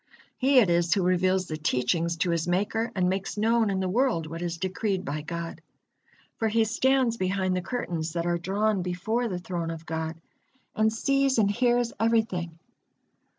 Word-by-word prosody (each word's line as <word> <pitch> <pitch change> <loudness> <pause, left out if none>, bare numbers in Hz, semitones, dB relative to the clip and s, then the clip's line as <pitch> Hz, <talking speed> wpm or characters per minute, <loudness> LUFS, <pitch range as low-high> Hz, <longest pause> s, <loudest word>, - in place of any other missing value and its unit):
He 270 +1 +4
it 235 -6 +7
is 170 +1 +2
who 195 - +1
reveals 185 +1 +2
the 155 -3 -5
teachings 160 +4 0
to 175 +2 0
his 170 0 -1
Maker, 210 +6 0
and 180 -2 +2
makes 190 +2 -2
known 225 +1 +2
in 190 -1 -1
the 190 - -1
world 220 -4 +1
what 165 +2 -7
is 170 -1 -3
decreed 190 +1 -2
by 150 -1 -3
God. 170 +2 -6 0.8
For 225 - 0
he 225 +1 +3
stands 245 +1 +2
behind 185 -1 0
the 180 - -1
curtains 175 -7 -3
that 170 -1 -2
are 175 0 0
drawn 200 +3 0
before 195 +7 -1
the 185 -5 -3
Throne 175 -2 -4
of 165 0 -6
God, 160 0 -3 0.6
and 220 0 +3
sees 275 +3 +1
and 205 -3 +3
hears 240 +1 +1
everything. 220 -8 0
185 Hz, 180 wpm, -27 LUFS, 170-225 Hz, 0.8 s, it